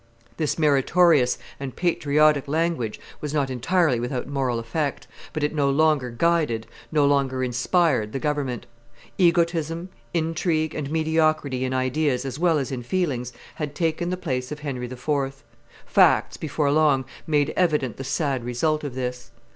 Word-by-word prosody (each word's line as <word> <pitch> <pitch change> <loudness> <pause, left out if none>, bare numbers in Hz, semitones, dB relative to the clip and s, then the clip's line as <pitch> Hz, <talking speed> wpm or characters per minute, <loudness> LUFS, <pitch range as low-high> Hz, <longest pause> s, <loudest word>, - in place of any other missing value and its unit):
This 155 -2 -1
meritorious 150 -1 +4 0.2
and 135 -2 -6
patriotic 150 -4 +2
language 155 -7 -1 0.2
was 150 0 -3
not 140 -3 0
entirely 135 +1 +2
without 125 +1 -3
moral 135 -4 -1
effect, 140 +5 -2 0.3
but 155 - -3
it 150 - 0
no 145 -2 +2
longer 145 -2 +2
guided, 150 -4 +1 0.3
no 150 -2 +3
longer 135 -2 +1
inspired 125 - +1
the - - -3
government; 135 -4 -2 0.5
egotism, 170 -1 +2 0.2
intrigue, 160 -1 0
and 145 -2 -4
mediocrity 155 -4 +1
in 130 - -2
ideas 130 0 0
as 135 +1 -5
well 170 -2 +3
as 135 -2 -2
in 130 -2 -3
feelings 125 -4 -1 0.2
had 150 -2 -5
taken 165 +1 0
the 185 - -2
place 130 -7 -3
of 150 0 -6
Henry 130 -4 -4
IV. 135 +2 -3 0.4
Facts, - - +4
before 150 -2 -1
long, 145 -3 +3 0.2
made 145 -3 +1
evident 150 -9 +1
the 135 - -5
sad 140 -2 -1
result 150 +6 0
of 140 -4 -5
this. 125 -2 -4
145 Hz, 150 wpm, -24 LUFS, 130-160 Hz, 0.5 s, meritorious